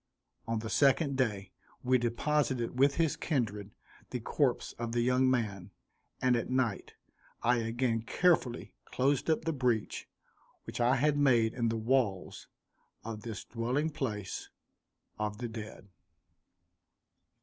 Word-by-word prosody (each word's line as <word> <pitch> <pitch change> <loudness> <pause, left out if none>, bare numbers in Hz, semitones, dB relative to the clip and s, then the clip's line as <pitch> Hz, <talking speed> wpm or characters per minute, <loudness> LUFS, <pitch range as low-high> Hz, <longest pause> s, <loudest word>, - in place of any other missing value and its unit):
On 115 0 0
the 110 0 -4
second 140 0 +3
day 105 -7 -1 0.3
we 130 0 +3
deposited 125 0 0
with 140 +1 +5
his 165 -3 +1
kindred, 105 - -2 0.4
the - - -3
corpse - - 0
of 115 -1 -3
the 120 - +2
young 125 +2 +3
man, 105 -7 -1 0.5
and 125 -1 +3
at 120 - -2
night 125 -5 -1 0.5
I 120 +1 +4
again 115 0 0
carefully 125 0 +1
closed 135 +3 0
up 160 0 +1
the 165 - 0
breach 125 -6 -1 0.5
which - - -5
I 125 +2 +4
had 145 +3 +2
made 120 -5 +4
in 120 -2 0
the 115 - -1
walls 110 -5 0 0.6
of 110 -1 -6
this 110 -2 -6
dwelling 125 +7 -1
place 105 -9 -4 0.7
of 105 0 -2
the 120 +1 -4
dead. 110 -3 -8
120 Hz, 135 wpm, -31 LUFS, 110-130 Hz, 0.7 s, with